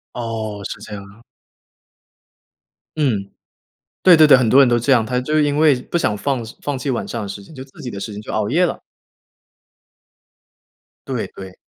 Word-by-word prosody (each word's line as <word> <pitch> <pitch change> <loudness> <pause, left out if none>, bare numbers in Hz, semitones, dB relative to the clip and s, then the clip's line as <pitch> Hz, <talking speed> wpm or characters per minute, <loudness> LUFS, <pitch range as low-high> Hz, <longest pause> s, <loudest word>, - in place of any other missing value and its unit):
哦， 110 -3 -4
是 - - -6
这 105 -1 -9
样 100 -1 -7
啊。 105 +4 -18 1.7
嗯， 110 -10 0 0.7
对 180 -2 +8
对 155 -1 +7
对， 145 - +7
很 125 -3 +1
多 130 - +5
人 135 - +7
都 120 0 +3
这 120 +4 -1
样， 120 -4 +4
他 125 +3 -1
就 155 +4 0
因 145 0 +1
为 155 -3 +5
不 170 - -2
想 110 -9 0
放 130 +2 -2 0.2
放 145 -2 -2
弃 135 - -5
晚 120 - -2
上 - - -4
的 100 - -5
时 100 +1 -7
间， 155 - -15
就 130 - -8
自 135 - -21
己 125 - -5
的 100 - -7
时 110 - -5
间 105 - -7
就 - - -8
熬 105 -1 -1
夜 175 +8 +2
了。 - - -2 2.3
对 - - -3
对。 95 -1 -11
120 Hz, 210 characters per minute, -19 LUFS, 105-145 Hz, 2.3 s, 对